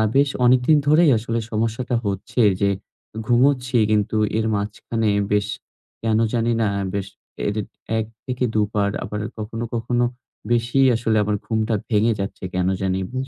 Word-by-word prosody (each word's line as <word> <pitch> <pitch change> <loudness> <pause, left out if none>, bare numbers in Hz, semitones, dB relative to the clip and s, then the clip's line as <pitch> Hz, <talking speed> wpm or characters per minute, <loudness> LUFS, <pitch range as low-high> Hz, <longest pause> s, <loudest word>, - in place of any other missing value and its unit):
বেশ 140 0 +4 0.2
অনেকদিন 130 +5 +5
ধরেই 155 0 +6
আসলে 115 +1 -2
সমস্যাটা 115 +3 -1
হচ্ছে 105 +6 -1 0.2
যে, 100 - +4 0.6
ঘুমোচ্ছি 125 0 +3
কিন্তু 105 +1 +1 0.2
এর 110 - 0
মাঝখানে 105 +2 -2 0.2
বেশ, 105 0 +2 0.6
কেন 110 -1 +2 0.2
জানি 115 0 +1
না 110 - +2 0.3
বেশ, 100 -1 -2 0.4
এডিট 105 0 -2 0.3
১ 110 - -1 0.2
থেকে 125 -1 -2
২ 105 -1 +3
বার 100 -1 +1
আবার 105 - -4 0.2
কখনো, 115 +2 -4
কখনো 120 +1 0 0.5
বেশিই 120 +3 +3
আসলে 110 -2 +1
আমার 105 0 0
ঘুমটা 110 0 0 0.2
ভেঙে 110 +1 +3
যাচ্ছে 100 -1 -5
কেন 90 0 +1
জানি 95 0 0
বুঝ 130 +1 -3
115 Hz, 150 wpm, -22 LUFS, 105-125 Hz, 0.6 s, ধরেই